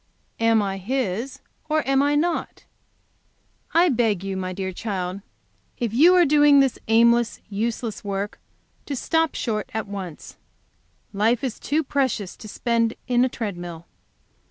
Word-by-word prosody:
Am 225 -2 +3
I 195 -1 -3
His 240 +2 -2 0.3
or 310 -2 +1
am 270 0 +3
I 290 +1 +2
not?' 335 +3 -1 1.1
"I 340 +2 +5
beg 225 - +1
you, 195 -1 -3
my 185 -1 -3
dear 190 0 -4
child, 185 -1 -4 0.6
if 235 -3 -2
you 330 +9 +6
are 355 -1 +6
doing 290 -1 +6
this 270 -2 +2
aimless, 235 +1 +3
useless 220 +1 -3
work, 200 0 -4 0.5
to 285 - -3
stop 325 +3 0
short 215 -3 -2
at 220 -1 -2
once. 190 -6 -8 0.8
Life 220 +5 +1
is 255 -4 -3
too 305 +3 0
precious 260 -9 -1
to 215 - -10
spend 230 +1 0
in 245 -1 +3
a 255 - +2
tread 210 -7 -4
mill.. 170 -1 -8
230 Hz, 150 wpm, -23 LUFS, 200-270 Hz, 1.1 s, you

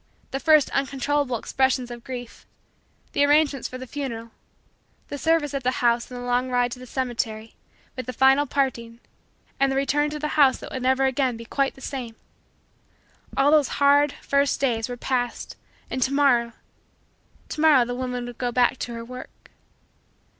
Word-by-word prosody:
The 270 - -2
first 305 +1 +4
uncontrollable 275 -1 0
expressions 260 +1 0
of 240 -1 -9
grief 245 -2 -8 0.6
the 285 - +2
arrangements 290 -2 +3
for 255 - -8
the 260 - -8
funeral 235 -4 -6 0.8
the 285 - -5
service 320 -2 +1
at 275 - -2
the 250 - +1
house 235 -1 +1
and 250 -1 -7
the 245 - -6
long 245 +1 0
ride 245 -1 +1
to 250 - -7
the 255 - -11
cemetery 230 -4 -3 0.4
with 255 -2 -6
the - - -2
final 270 +3 +4
parting 235 -4 -2 0.6
and 275 0 +3
the - - -1
return 290 +2 +1
to 300 - -5
the 300 0 -3
house 280 -4 +4
that - - -10
would 260 - -4
never 260 +1 +2
again 260 -2 0
be 230 - -9
quite 275 +3 -1
the 270 - -15
same 250 -4 -5 1.2
all 275 +2 +4
those 305 -3 +3
hard, 285 0 +4
first, 280 -1 +1
days 235 -4 0
were 245 - -5
past 245 -1 -2 0.3
and 260 - -4
to 260 - +2
morrow 250 -5 +3 1.0
to 305 - -4
morrow 295 -6 +6
the 245 - -4
woman 250 -1 -3
would 245 -1 -9
go 245 -1 -1
back 250 +2 +2
to 240 - -4
her 230 0 -7
work. 250 +1 -11
260 Hz, 180 wpm, -24 LUFS, 245-280 Hz, 1.2 s, morrow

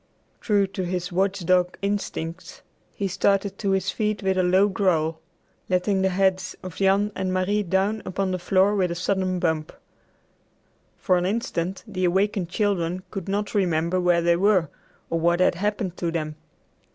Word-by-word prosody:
True 205 -3 +2
to 190 -1 -5
his 180 +1 -3
watchdog 185 -1 +1
instincts, 185 -4 -4 0.3
he 200 - -3
started 195 +1 0
to 200 - -1
his 190 0 +1
feet 210 -2 -2
with 190 0 +1
a 185 - +2
low 185 +3 +4
growl, 165 -5 0 0.5
letting 190 +1 +1
the 190 - +2
heads 190 0 0
of 185 -2 -8
Jan 200 +2 +2
and 185 -1 -2
Marie 185 +3 +1
down 195 +3 0
upon 190 0 -2
the 185 - -2
floor 190 +3 +3
with 185 -3 +1
a 170 - -3
sudden 185 +1 0
bump. 160 -3 -1 1.3
For 185 -4 +2
an 175 - -1
instant 190 -4 -2
the 185 -3 -2
awakened 190 0 +1
children 185 -3 -1
could 195 -3 -5
not 205 +1 -2
remember 180 -2 +1
where 175 -1 +3
they 170 0 +3
were 185 -4 +3 0.4
or 165 - +1
what 170 +1 +2
had 185 - +4
happened 200 0 -2
to 170 - -1
them. 155 -2 -3
185 Hz, 165 wpm, -24 LUFS, 175-200 Hz, 1.3 s, low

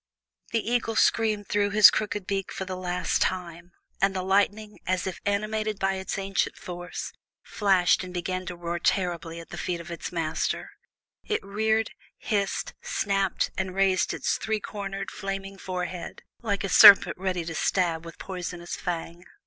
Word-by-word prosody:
The 225 -1 -1
eagle 235 -1 0
screamed 215 -2 +2
through 205 0 +1
his 210 0 +8
crooked 210 -2 -2
beak 195 -1 -2
for 190 - -4
the 185 0 -4
last 180 -1 -1
time, 175 -1 -2 0.3
and 195 0 +3
the 185 - -1
lightning, 205 +2 +1
as 185 -1 0
if 190 - -5
animated 215 +1 -1
by 195 0 +1
its 190 +1 -4
ancient 195 0 -1
force, 175 0 -6 0.3
flashed 190 -4 +2
and 185 - -7
began 185 +1 -3
to 180 - -4
roar 170 0 -4
terribly 170 -2 -1
at 165 - -11
the 175 - -7
feet 175 -2 -2
of 170 0 -9
its 170 - -5
master; 160 -2 -2 0.5
it 430 - -2
reared, 220 +2 +1 0.3
hissed, 200 -2 -1
snapped, 195 -2 0
and 185 -1 -3
raised 190 -1 +2
its - - -1
three 220 -1 -1
cornered, 195 -1 -5
flaming 195 -1 -5
forehead, 180 -1 -5 0.2
like 205 -4 -1
a 195 - -2
serpent 205 +1 +9
ready 185 -3 -1
to 165 - -4
stab 170 -1 0
with 165 -1 -10
poisonous 175 -2 -5
fang. 170 -1 -5
190 Hz, 165 wpm, -27 LUFS, 175-205 Hz, 0.5 s, serpent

